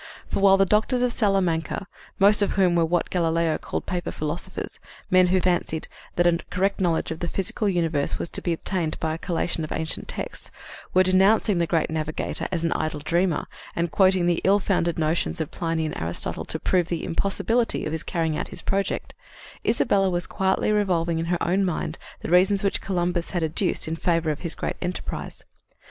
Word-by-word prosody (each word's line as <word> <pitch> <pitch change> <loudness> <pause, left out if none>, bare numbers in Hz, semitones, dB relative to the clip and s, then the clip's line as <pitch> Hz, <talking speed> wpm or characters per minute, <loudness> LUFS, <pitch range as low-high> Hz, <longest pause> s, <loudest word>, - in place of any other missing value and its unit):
For, - - -1
while 195 0 +6
the 195 - +4
doctors 220 +6 +2
of 250 - +2
Salamanca 195 -4 0 0.3
most 205 +2 +6
of 200 - +2
whom 185 -2 +3
were 170 -1 +3
what 170 +1 0
Galileo 165 -2 +1
called - - -4
"paper 175 -2 -3
philosophers," 155 +3 -5 0.3
men 185 0 +6
who 185 +1 +3
fancied 175 -3 0 0.3
that 175 - +2
a 170 -1 +3
correct 195 +2 0
knowledge 170 -3 +1
of 160 - -4
the 175 - -2
physical 195 +3 -1
universe 165 -6 +1
was - - -4
to - - -2
be 175 - -1
obtained 165 -1 -2
by 160 -1 -1
a 165 - -5
collation 170 -2 -1
of 155 - -6
ancient 160 -1 -3
texts - - -4 0.4
were 185 - +5
denouncing 190 +1 +4
the 170 - +1
great 165 -1 +1
navigator 155 0 -2
as 170 -3 -1
an 165 - +1
idle 155 -1 -1
dreamer, 170 +2 0 0.3
and 170 -1 -1
quoting 185 -2 +4
the 175 -1 +1
ill 195 +2 +5
founded 180 -4 0
notions 160 +1 0
of 160 - -3
Pliny 165 -1 -1
and 155 - -4
Aristotle 85 +1 -2
to - - -1
prove 180 -3 +1
the 170 -1 -3
impossibility 225 +6 0
of 155 - -3
his 160 -1 -2
carrying 165 -2 -1
out - - -3
his - - -4
project, 195 0 -1 0.5
Isabella 200 -4 +2
was 175 -1 -1
quietly 190 +2 0
revolving 175 -6 +1
in 165 - -1
her 175 0 -1
own 185 +3 +2
mind 180 -3 -2 0.2
the - - -5
reasons 190 +3 +4
which 200 - +1
Columbus 175 -2 -1
had 175 -3 -1
adduced 160 +3 +1
in 160 - -2
favor 165 -1 +1
of 150 - -4
his 170 -3 -2
great - - -3
enterprise. 180 0 -5
175 Hz, 195 wpm, -24 LUFS, 165-190 Hz, 0.5 s, while